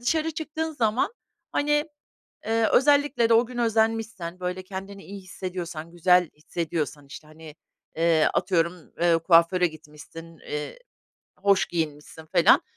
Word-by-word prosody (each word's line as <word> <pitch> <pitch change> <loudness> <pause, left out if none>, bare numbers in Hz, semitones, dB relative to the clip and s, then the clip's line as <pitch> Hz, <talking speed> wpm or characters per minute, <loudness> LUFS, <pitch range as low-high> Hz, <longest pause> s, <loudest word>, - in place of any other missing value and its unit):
dışarı 315 +6 0
çıktığın 315 +1 -4
zaman, 240 - 0 0.4
hani, 295 +2 +1 0.6
ııı, 225 0 +2
özellikle 285 -4 +3
de 230 - +5
o 230 +2 +5
gün 245 +1 -9
özenmişsen, 220 -6 0
böyle, 180 +1 -4
kendini 195 +1 -8
iyi 200 0 -9
hissediyorsan, 180 -3 -6
güzel 180 0 +3
hissediyorsan, 150 -3 -4
işte, 150 +2 -11
hani, 155 0 -13 0.4
eee, 165 -1 +3
atıyorum, 170 -2 +1 0.5
kuaföre 170 +1 +4
gitmişsin, 155 +1 -12
eee, 150 - -6 0.6
hoş 200 -1 +3
giyinmişsin 160 -1 -5
felan. 155 - +5
180 Hz, 120 wpm, -25 LUFS, 165-225 Hz, 0.6 s, de